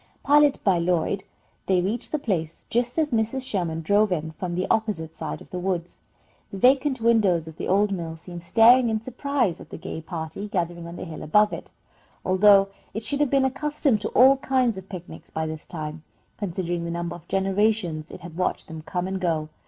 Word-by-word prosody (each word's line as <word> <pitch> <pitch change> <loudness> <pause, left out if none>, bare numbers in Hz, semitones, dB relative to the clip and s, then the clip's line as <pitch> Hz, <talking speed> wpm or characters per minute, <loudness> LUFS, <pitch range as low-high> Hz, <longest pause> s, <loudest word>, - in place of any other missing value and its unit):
Piloted 290 0 +4
by 190 -4 +3
Lloyd, 180 +3 0 0.4
they 190 -2 +3
reached 210 +7 -2
the 305 - +1
place 170 - -3
just 240 +3 0
as 310 -2 +1
Mrs. 230 +3 0
Sherman 165 -5 -2
drove 205 +4 +3
in 160 -2 -1
from 175 +2 -4
the 185 +1 0
opposite 185 -8 -1
side 160 - -5
of - - -15
the 180 - -3
woods. 180 -2 -3 0.5
The 195 - -7
vacant 260 +3 +3
windows 205 -8 +3
of 160 - -10
the - - -4
old 200 +2 +3
mill 165 -4 -4
seemed 175 +1 -9
staring 235 +6 +6
in 220 -1 0
surprise 250 - -1
at - - -13
the - - -7
gay 160 - -6
party 165 +4 -6
gathering 175 -3 -3
on 170 - -8
the - - -6
hill 160 -3 -8
above 210 +7 +3
it, - - -7 0.6
although 195 +1 +5 0.3
it 220 - -3
should 285 +4 -1
have 295 -2 +2
been 275 0 +3
accustomed 270 -3 0
to - - -2
all 265 +2 +7
kinds 260 -4 +1
of 190 0 -10
picnics 180 -3 -9
by 160 0 -3
this 155 0 -6
time, 155 -2 -6 0.4
considering 175 -3 -2
the 170 - -4
number 170 0 -3
of 175 - -14
generations 195 -4 0
it - - -10
had 170 -1 -10
watched 180 +1 -1
them 160 -1 -7
come 180 +3 -3
and 190 0 -3
go. 160 -3 0
190 Hz, 205 wpm, -25 LUFS, 170-225 Hz, 0.6 s, all